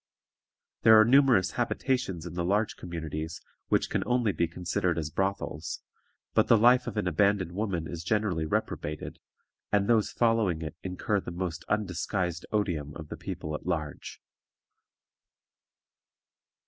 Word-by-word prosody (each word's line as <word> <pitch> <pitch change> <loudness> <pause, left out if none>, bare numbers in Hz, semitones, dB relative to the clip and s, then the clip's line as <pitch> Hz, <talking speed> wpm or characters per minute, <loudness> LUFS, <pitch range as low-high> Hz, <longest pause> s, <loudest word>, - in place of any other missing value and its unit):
There 110 -1 +8
are 110 - +7
numerous 125 -7 +5
habitations 120 -7 -1
in 85 - -7
the 85 0 -2
large 105 +4 +1
communities 80 -1 -5 0.3
which - - +2
can - - +1
only 120 -3 +2
be 85 -3 0
considered 90 0 -1
as 80 -1 -3
brothels, 95 -5 -2 0.5
but - - +3
the 115 - +6
life 125 +3 +5
of - - -4
an 105 - 0
abandoned 95 +1 +2
woman 95 -4 -2
is 85 0 -6
generally 90 -4 0
reprobated, 75 0 -3 0.5
and 100 -1 +2
those 115 -3 +3
following 110 -8 +1
it 80 - -6
incur 95 +2 -1
the - - -7
most 85 -2 -4
undisguised 90 -3 -1
odium 85 -9 -1
of 80 -2 -9
the - - -5
people 75 - -5
at 75 - -6
large. 80 -4 -3
90 Hz, 140 wpm, -28 LUFS, 80-105 Hz, 0.5 s, There